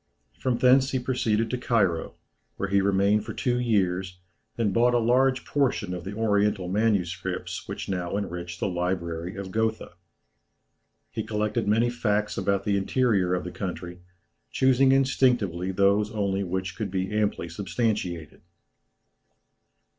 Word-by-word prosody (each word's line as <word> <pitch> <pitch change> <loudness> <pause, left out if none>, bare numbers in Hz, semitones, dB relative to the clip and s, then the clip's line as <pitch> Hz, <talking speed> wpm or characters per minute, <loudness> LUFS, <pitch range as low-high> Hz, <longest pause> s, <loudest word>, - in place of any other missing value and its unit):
From 125 -2 0
thence 130 +2 +5
he 130 - 0
proceeded 115 -3 0
to 125 - -2
Cairo, 100 -10 0 0.4
where 95 - -2
he 100 0 +3
remained 100 +2 +2
for 110 0 -7
two 125 -2 0
years, 95 -6 0 0.4
and 110 -4 +1
bought 120 +3 +3
a - - +5
large 125 +2 +2
portion 125 -9 0
of 90 -1 -6
the 100 +2 -5
oriental 105 -3 +1
manuscripts 95 -3 -1
which - - -5
now 90 0 -2
enrich 85 -3 -5
the - - 0
library 90 -1 -3
of 100 -1 -6
Gotha. 110 +1 -1 1.2
He - - -3
collected 105 +1 -1
many 115 +3 +3
facts 105 -3 0
about 100 -1 0
the 100 -1 +1
interior 100 -3 +1
of 90 - -3
the 90 - -6
country, 90 -2 -6 0.5
choosing 130 0 +3
instinctively 125 -9 +2
those 100 +2 +2
only 100 -2 -1
which 95 0 -3
could 105 -2 -3
be 95 +1 -2
amply 105 -5 0
substantiated. 90 -2 -3
100 Hz, 140 wpm, -26 LUFS, 90-115 Hz, 1.2 s, thence